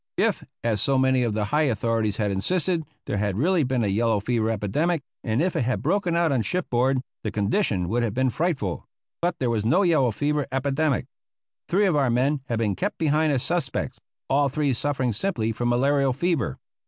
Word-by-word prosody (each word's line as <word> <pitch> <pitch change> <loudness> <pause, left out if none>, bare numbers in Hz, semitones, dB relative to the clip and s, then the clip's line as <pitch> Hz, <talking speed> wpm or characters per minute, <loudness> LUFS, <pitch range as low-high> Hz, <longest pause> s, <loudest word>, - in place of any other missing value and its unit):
If, - - +1 0.2
as 110 -3 +1
so 135 -1 +2
many 130 -1 +3
of 115 -3 0
the 105 0 0
high 150 -1 +3
authorities 115 -2 0
had 105 -2 0
insisted, 165 - 0 0.2
there 100 - -2
had 100 -2 -1
really 170 - +2
been 130 -2 0
a - - +1
yellow 110 +2 +1
fever 110 +1 0
epidemic, 135 - 0 0.2
and 115 +6 0
if 185 - -1
it - - +1
had 125 +1 -1
broken 190 -4 +1
out 170 -2 +2
on 130 -4 +2
shipboard, 130 -4 0 0.2
the 110 - -1
condition 100 - 0
would 120 +6 0
have 115 -3 -1
been 130 0 +2
frightful; 140 - -2 0.3
but 175 0 0
there 125 -3 0
was 110 -3 0
no 170 - +3
yellow 155 -8 +3
fever 145 +6 -1
epidemic. 140 +2 0 0.6
Three 200 +4 +3
of 180 -5 +2
our 140 -3 +2
men 135 +4 +1
had 115 - -1
been 110 -3 0
kept 200 +3 -2
behind 155 0 +2
as 130 -3 +1
suspects, 175 +1 -2 0.3
all 140 +1 +2
three 145 0 0
suffering 130 -1 -1
simply 115 - -1
from 120 +2 -1
malarial 135 +2 +2
fever. 165 - -1
130 Hz, 200 wpm, -24 LUFS, 115-155 Hz, 0.6 s, many